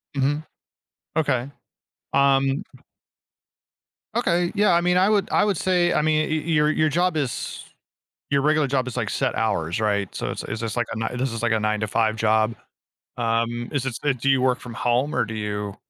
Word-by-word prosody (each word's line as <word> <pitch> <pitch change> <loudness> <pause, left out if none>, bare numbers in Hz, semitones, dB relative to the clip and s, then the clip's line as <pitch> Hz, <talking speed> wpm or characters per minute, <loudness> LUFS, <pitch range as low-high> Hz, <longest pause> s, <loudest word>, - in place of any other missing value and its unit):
Mhm. 145 +3 0 0.7
Okay. 135 -4 0 0.6
Um 135 0 +3 1.5
Okay, 175 0 +1
yeah, 205 -2 +4
I 170 - +4
mean, 180 +1 +2
I 185 +2 +4
would 210 -2 +2
I - - +3
would 205 -2 +1
say 175 0 +2
I - - +2
mean, 155 0 +1
y 155 - +1
your, 150 -1 +2
your 155 0 +2
job 175 +2 +1
is 140 -5 -3 0.7
your 140 0 +2
regular 155 0 +3
job 130 -1 0
is 125 - -5
like - - -1
set - - -1
hours, 85 +5 -1
right? 100 -3 0
So, - - -3
it's - - -5
it's 110 - -5
this 115 -1 -4
like 120 -1 0
a, 115 - -4
ni 115 +2 -3
this 130 0 -1
is 115 - -5
like 120 -1 +1
a 110 - +1
nine-to-five 110 +1 0
job. 110 +1 +2 0.6
Um, 115 0 -1
is 135 -3 -1
it 130 - -3
so 145 - 0
do 135 +1 -1
you 135 -1 +3
work 130 -1 +2
from 120 - -9
home 120 +5 0
or - - +2
do 110 - -6
you 105 -2 -4
130 Hz, 195 wpm, -23 LUFS, 115-155 Hz, 1.5 s, yeah